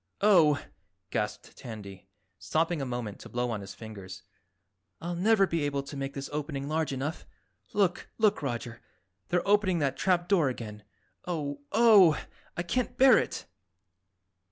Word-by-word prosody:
"Oh!" 170 -8 +5 0.5
gasped - - -3
Tandy, 100 -5 -9 0.3
stopping 165 0 0
a 135 - -3
moment 120 -5 -4
to - - -11
blow 120 0 -1
on 105 -3 -3
his 100 0 -9
fingers. 100 -4 -9 0.8
"I'll 175 +2 -4
never 195 +3 +4
be 170 -3 -1
able 140 -1 -1
to 140 - -9
make 135 0 -4
this 140 0 -4
opening 145 -2 -3
large 155 0 0
enough. 140 +4 -4 0.4
Look, 195 -4 0
look, 215 -2 +3
Roger, 120 -3 -4 0.5
they're 175 +1 0
opening 200 -3 +3
that 140 -4 0
trap 175 -2 +1
door 175 -8 +3
again. 105 -4 -7 0.5
Oh, 145 -5 -3
Oh! 205 -7 +6 0.4
I 170 - -1
can't 245 +7 -2
bear 265 0 +7
it!" - - -4
150 Hz, 150 wpm, -29 LUFS, 125-180 Hz, 0.8 s, bear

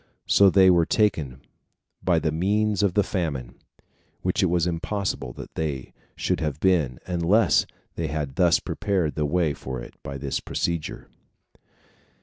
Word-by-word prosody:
So 100 -1 +6
they 95 0 +6
were 85 -2 +3
taken 80 - 0 0.6
by 90 -2 +3
the 80 -1 0
means 100 +4 +1
of 100 -3 +1
the 105 - +4
famine, 70 -12 -3 0.7
which - - +1
it - - +3
was 85 -1 +1
impossible 85 - -3 0.2
they 70 -5 -4 0.2
should - - -1
have 75 -3 -2
been, 80 -10 +2
unless 90 +3 +3 0.3
they 80 - -3
had 75 -2 -3
thus 85 -2 +4
prepared 90 -7 -1
the 75 -1 -1
way 80 -1 +1
for 65 -2 -6
it - - -10
by 70 0 -6
this 70 0 -2
procedure. 85 -2 -3
85 Hz, 145 wpm, -25 LUFS, 75-95 Hz, 0.7 s, So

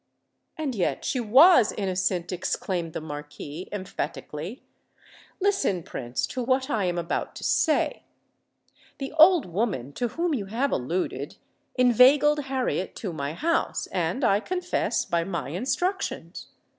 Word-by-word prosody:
"And 300 -4 -2
yet 190 -6 -1
she 260 - 0
was 250 - +6
innocent!" 185 -3 -1
exclaimed 180 -2 -2
the - - -4
Marquis, 150 +2 -8
emphatically. 185 - -5 0.8
"Listen, 390 - +1
Prince, 120 -4 -3
to 255 - -4
what 260 +3 0
I 210 -6 +1
am 175 -1 -1
about 170 0 -3
to - - -8
say. 315 - +1 1.0
The 270 +1 -5
old 340 -1 +7
woman 175 - -2
to 245 - -1
whom 335 +7 -1
you 210 -8 -2
have 245 +7 -1
alluded, 165 +9 -2 0.4
inveigled 270 +4 +5
Harriet 260 -8 -2
to 190 -6 -5
my 145 -1 -3
house—and, 195 - -1
I 200 -4 +4
confess, 360 - -1
by 170 -1 0
my 170 -5 -4
instructions. 350 - -2
210 Hz, 130 wpm, -26 LUFS, 175-270 Hz, 1.0 s, old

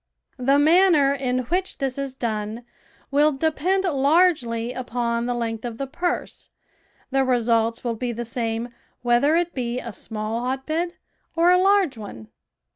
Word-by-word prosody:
The 270 +3 +3
manner 310 -2 +5
in 255 -2 -1
which 370 +1 -1
this 270 -2 -2
is 275 -2 -4
done 220 -1 -3 0.5
will 295 +2 +4
depend 320 +6 0
largely 280 -7 +2
upon 235 -1 -2
the 245 - -1
length 225 -2 -3
of 235 -2 -5
the 275 - -3
purse, 345 +6 -3 0.6
the 270 0 +2
results 230 -2 +1
will 240 -2 -1
be 240 +2 -3
the 235 +1 -5
same 230 0 -3 0.3
whether 245 +6 +3
it 345 0 0
be 245 -1 -2
a 235 -3 -7
small 215 +3 -4
hotbed 310 +8 -2 0.4
or 340 +2 +4
a 360 - +6
large 385 - +3
one. 115 - -9
255 Hz, 150 wpm, -23 LUFS, 235-310 Hz, 0.6 s, a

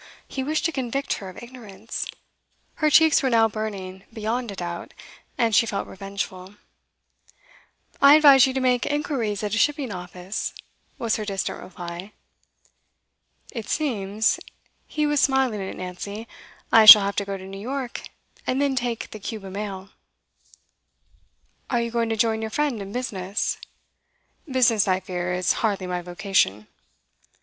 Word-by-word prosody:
He 265 - -4
wished 300 +3 -1
to 330 - +2
convict 270 -1 -2
her 195 - -8
of 185 - -11
ignorance. 225 -4 -7 0.7
Her 305 - +4
cheeks 315 +1 +6
were 265 - +1
now 225 -2 +4
burning, 195 -4 -6
beyond 230 +2 -3
a 200 - -6
doubt, 175 -2 -6 0.4
and 230 -2 +1
she 230 +3 +4
felt 200 -2 -2
revengeful. 195 0 -6 1.5
'I 280 +1 +9
advise 280 -4 +7
you 260 - -2
to 265 - -1
make 250 -2 +1
inquiries 255 -8 -2
at 210 -1 -2
a 225 - +1
shipping 285 -2 +1
office,' 180 +1 -5 0.4
was 235 -4 0
her 215 - -4
distant 195 -2 -3
reply. 175 +2 -8 1.4
'It 230 -5 -6
seems' 220 -7 0 0.5
he 300 0 -1
was 295 -1 +2
smiling 265 -6 +2
at 190 - -6
Nancy 200 +5 -6 0.4
'I 225 -1 +7
shall 210 -1 +13
have 200 0 -2
to 200 - 0
go 195 0 -4
to 190 - -10
New 195 +1 -8
York, 255 +1 -4 0.5
and 255 - 0
then 280 -1 +1
take 240 -3 -3
the 215 - -8
Cuba 200 -2 -6
mail.' 195 -1 -6 1.8
'Are 240 - +1
you 235 0 -2
going 230 -1 0
to 225 - -1
join 220 0 +1
your 220 - -3
friend 280 -3 -1
in 195 0 -7
business?' 200 -5 -3 0.9
'Business, 230 -6 +3
I 185 -1 +2
fear, 180 -2 -4
is 180 0 +1
hardly 200 -4 0
my 180 -1 -3
vocation. 175 - 0
215 Hz, 155 wpm, -24 LUFS, 195-255 Hz, 1.8 s, shall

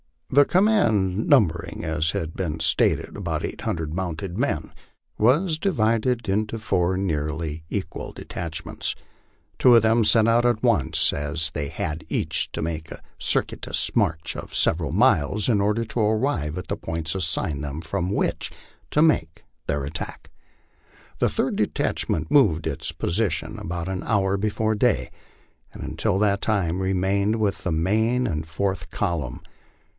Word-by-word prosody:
The 145 +2 +6
command, 110 - +2
numbering, 100 - +2
as 80 0 0
has 80 - -2
been 80 -1 -4
stated, - - +2
about - - -3
eight - - -5
hundred 80 -2 -3
mounted 90 0 -4
men, 120 - -1 0.5
was 155 - +3
divided 120 - +1
into 105 +3 0
four 95 -4 0
nearly 80 -3 -2
equal 95 -6 -4
detachments. 85 -2 -4 0.6
Two 125 -2 +7
of 115 - +6
them 115 +1 +4
set 110 +1 +5
out 120 +1 +3
at 120 -3 +1
once, - - +2
as 75 +3 -2
they 75 -2 -2
had 75 +3 -4
each - - -1
to - - -3
make 80 -1 -4
a - - -9 0.2
circuit - - 0
ous - - -1
march 80 0 0
of - - -7
several 80 -4 +3
miles 95 +9 +2
in 110 -5 +3
order 105 +3 +1
to 115 - -4
arrive 110 - 0
at 90 - -6
the 100 - -2
points 80 -4 -3
assigned 80 -5 -1
them, 75 +2 -4
from 85 +2 -2
which 100 - 0 0.4
to 150 - +3
make 80 - +1 0.2
their 70 -1 -1
attack. 75 +5 -6 0.9
The - - +3
third - - -1
detachment 80 -1 -1
moved 95 - +4
to - - -1
its - - -4
position 100 +4 -1
about 85 +1 -4
an 95 -1 -3
hour 100 -2 +1
befare 110 +1 0
day, 125 -1 +2 0.6
and - - -8
until - - -1
that 100 -1 +2
time 95 -5 0
remained 95 +3 +1
with 105 -3 -1
the 90 - -1
main 110 +9 +1
or 75 -7 -1
fourth 95 +5 -3
column. 85 -11 -2
95 Hz, 155 wpm, -24 LUFS, 80-110 Hz, 0.9 s, Two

